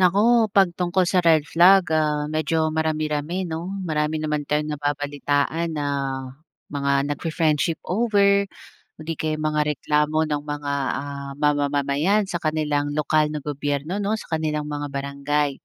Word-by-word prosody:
Naku, 215 +5 +4
pag 195 -2 +6
tungkol 180 +1 +2
sa 180 0 +2
red 160 -3 +5
flag, 185 +3 +6 0.2
ah, 150 -1 0
medyo 160 +1 0 0.2
marami-rami, 155 +1 -1
'no, 160 0 -3 0.3
marami 150 0 0
naman 150 -1 -1
tayong 150 +1 0
nababalitaan 145 +2 -1
na 145 - -1 0.9
mga 140 0 0 0.2
nagfi-friendship 160 +1 0 0.2
over, 205 -4 +4 0.7
o - - -12
di 165 - -1
kaya'y 155 -1 -1
mga 150 0 0 0.2
reklamo 150 +1 +1
ng 145 -1 -1
mga, 145 -1 -4 0.3
ah, 140 -1 -6
ma-mamamayan 145 +6 +2
sa 175 - -1
kanilang 150 -2 0
lokal 150 0 +2
na 150 - -3
gobyerno 145 +3 -2
'no, 205 +1 0
sa - - -15
kanilang 150 -1 -2
mga 145 0 -3
barangay. 140 +1 -1
150 Hz, 140 wpm, -23 LUFS, 145-165 Hz, 0.9 s, pag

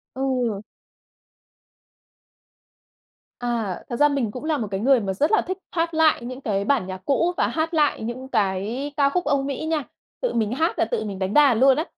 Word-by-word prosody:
Ừ. 250 -6 -1 2.8
À, 230 -6 -2
thật 240 - -3
ra 295 +3 +5
mình 275 -7 -1
cũng 250 +6 -8
là 310 -1 0
một 220 -5 -3
cái 195 -1 -2
người 260 +2 +4
mà 195 -3 -2
rất 295 - +1
là 430 - +4
thích 375 +1 -4
hát 330 -1 -1
lại 315 -6 +3
những 255 +2 -6
cái 200 -6 -1
bản 250 -5 +1
nhạc 185 0 -6
cũ, 335 +6 +1
và - - +2
hát 320 +1 -2
lại 300 -6 +2
những 240 +4 -5
cái 215 +6 -1
ca 280 -2 +3
khúc 355 +5 -1
Âu 280 -1 +1
Mỹ 275 +2 -4
nha, 315 -2 0 0.4
tự - - -1
mình 220 -2 0
hát 320 +7 0
là - - +3
tự 485 - -2
mình 200 -3 -5
đánh 190 +1 -2
đàn 280 -6 +5
luôn 265 0 +6
á. 310 - 0
265 Hz, 205 wpm, -23 LUFS, 220-300 Hz, 2.8 s, luôn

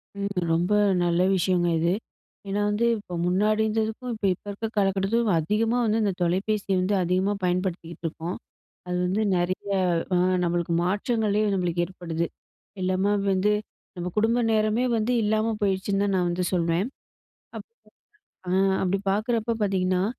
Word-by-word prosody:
ம், 200 0 -3 0.2
ரொம்ப 175 +4 0 0.3
நல்ல 175 0 +2
விஷயங்க 180 -1 +1
இது, 170 +2 +2 0.5
ஏனா 200 +1 -1
வந்து 210 +3 +1
இப்போ 205 -4 -10
முன்னாடி 210 +4 +2
இருந்ததுக்கும் 220 +3 -2
இப்ப 215 - -4
இப்ப 180 - -16
இருக்க 215 +3 -4
காலகட்டத்துக்கும் 195 +1 +2
அதிகமா 220 +8 +1
வந்து 220 +1 +1
இந்த 200 -2 +1
தொலைபேசிய 195 +3 0
வந்து 195 +3 +1
அதிகமா 185 +3 +1
பயன்படுத்திகிட்ருக்கோம். 175 -2 -3 0.5
அது 180 0 -1
வந்து 190 +4 0 0.2
நிறைய 185 +3 -2 0.5
அ - - +4 0.3
நம்மளுக்கு 170 -1 0
மாற்றங்களே 210 +2 0
நம்ளுக்கு 175 -2 0
ஏற்படுது, 170 -2 -4 0.6
எல்லாம 185 +2 +1 0.2
வந்து 195 +2 +2 0.4
நம்ம 175 0 -3
குடும்ப 225 +3 +3
நேரமே 215 +2 +2
வந்து 220 +2 0
இல்லாம 215 +1 +1
போயிருச்சுன்னு 195 0 0
தான் 200 -1 0
நான் 180 -1 +1
வந்து 175 +1 -1
சொல்வேன். 170 +3 +1 0.7
அப் - - -8 0.8
அ - - -1 0.3
அப்டி 190 +1 +1
பாக்குறப்ப 225 +2 0
பாத்தீங்கன்னா, 185 -2 +1
195 Hz, 135 wpm, -25 LUFS, 180-215 Hz, 0.8 s, அ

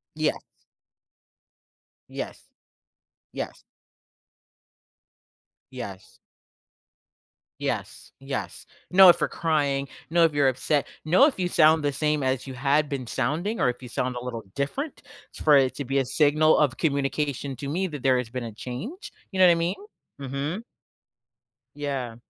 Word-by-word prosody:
Yes. - - +1 1.7
Yes, - - -6 0.9
yes. - - -6 2.1
Yes. - - -9 1.4
Yes, - - -4
yes. - - -5 0.2
No, 190 0 +9
if 175 - +7
you're - - +1
crying. 140 -4 0 0.2
No, 170 0 +4
if 160 - +3
you're 145 -2 +3
upset. 135 +3 0 0.2
No, 185 - +6
if 260 -11 -2
you 180 - +1
sound 160 -2 +5
the 145 -1 0
same 150 +1 0
as 130 0 -1
you 130 - -7
had 140 +3 +1
been 135 -3 -3
sounding, 160 - -1
or - - +3
if 125 +1 -3
you 125 - -8
sound 125 +1 -2
a 120 - -5
little 115 -3 -5
different 265 - -3 0.3
s - - -8
for 150 -2 +6
it 130 -2 +3
to 140 - -5
be 135 +2 0
a 135 - +2
signal 155 +3 +4
of 145 -4 +2
communication 140 -2 -1
to 140 - -6
me 185 +5 -1
that 145 -4 -7
there 130 -1 +4
has 120 -2 -4
been 125 -1 -4
a 115 - -6
change, 130 - -7 0.2
you 190 - -2
know 185 - +8
what 175 - +7
I - - +4
mean? 170 +3 0 0.5
Mhm. 140 - -3 1.1
Yeah. 135 -5 -3
145 Hz, 150 wpm, -25 LUFS, 130-160 Hz, 2.1 s, No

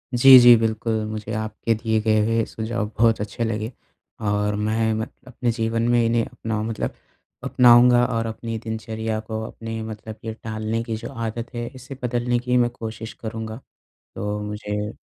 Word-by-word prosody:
जी, 130 +2 +10
जी, 120 -1 +9
बिल्कुल। 110 0 -1
मुझे 110 0 -5
आपके 110 +1 -1
दिए 110 0 0
गए 110 0 +3
हुए 115 0 +2
सुझाव 110 0 -3
बहुत 115 -1 +4
अच्छे 105 +3 -3
लगे 110 0 -2 0.6
और 105 0 +1
मैं, 110 +1 0
मैं 110 +1 -2 0.2
अपने 125 -1 -1
जीवन 115 0 0
में 120 -1 +4
इन्हें 115 0 +2
अपनाऊ 110 -1 -4
मतलब 110 -1 -3 0.5
अपनाऊँगा 120 0 +6
और 115 -2 -1
अपनी 115 0 -4
दिनचर्या 110 0 -4
को 110 -1 -3
अपने 115 0 -6
मतलब 110 0 -8
ये 110 - -3
टालने 110 +1 -2
की 115 -1 -3
जो - - -7
आदत 115 0 -4
है, 120 0 -3
इसे 130 +1 -9
बदलने 120 0 0
की 125 +1 +1
मैं 120 -1 +3
कोशिश 110 0 -6
करूँगा। 110 0 -6 0.6
तो 105 +1 -3
मुझे 105 0 -4
115 Hz, 170 wpm, -23 LUFS, 110-120 Hz, 0.6 s, जी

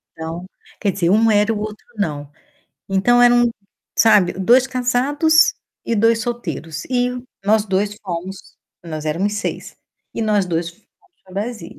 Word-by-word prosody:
Então 165 +2 -6 0.3
quer 200 - +1
dizer, 175 -3 0
um 220 +3 +4
era 210 +1 +3
e - - +1
o 210 - -4
outro 215 0 -6
não. 150 -8 -3 0.6
Então 220 +6 +3
eram, 240 0 +5 0.5
sabe, 210 -5 +5
2 240 +8 +4
casados 270 +5 +2 0.3
e 230 - -1
2 225 +1 +3
solteiros 165 - -5
e 250 -1 -1 0.2
nós 210 +1 +3
2 205 +1 -1
fomos, 185 +1 -7 0.3
nós 155 -2 -6
éramos 185 +7 -1
6, 205 - -4 0.4
e - - -3
nós 210 -3 +2
2 170 -1 -2
fomos 200 +5 -26 0.4
pra 185 - -17
Brasília. 210 -2 -5
210 Hz, 155 wpm, -19 LUFS, 180-240 Hz, 0.6 s, eram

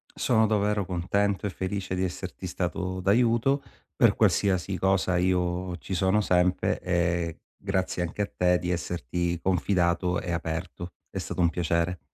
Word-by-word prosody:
Sono 110 -3 +3
davvero 105 -2 +1
contento 95 +3 0
e 105 - 0
felice 95 0 -3
di 90 0 0
esserti 95 0 -5
stato 95 +1 -3
d'aiuto, 120 +7 +3 0.3
per - - +4
qualsiasi 95 -1 +2
cosa 95 0 +2
io 90 0 0
ci 95 - -7
sono 95 +3 +2
sempre 90 -2 +2
e 85 -2 0 0.2
grazie 95 -2 -2
anche 90 +4 -4
a - - -5
te 90 0 +3
di 90 - -2
esserti 85 0 -2
confidato 90 -1 +1
e 90 - -4
aperto 85 +1 -4 0.2
è - - -7
stato - - -3
un 85 - +4
piacere. 85 0 0
90 Hz, 150 wpm, -27 LUFS, 90-95 Hz, 0.3 s, per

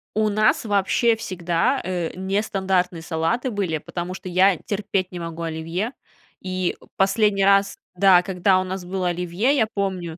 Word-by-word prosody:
У 215 0 +2
нас 215 +2 +2
вообще 210 +3 +2
всегда, 185 +5 -1
э, 175 -3 -2
нестандартные 190 -2 -1
салаты 165 - -1
были, 190 -7 -1
потому 175 +4 -5
что 185 - -9
я 185 +1 +4
терпеть 200 0 -2
не 180 - -6
могу 165 0 -6
оливье. 165 +7 -3 0.5
И, 185 -1 -2
э, - - -16
последний 195 +1 +2
раз 200 0 +3 0.2
да, 185 -1 +6
когда 185 0 +2
у - - -2
нас 185 -1 -5
было 185 -1 -1
оливье, 180 +9 0
я 220 -5 +2
помню 185 -4 -3
190 Hz, 160 wpm, -22 LUFS, 175-200 Hz, 0.5 s, да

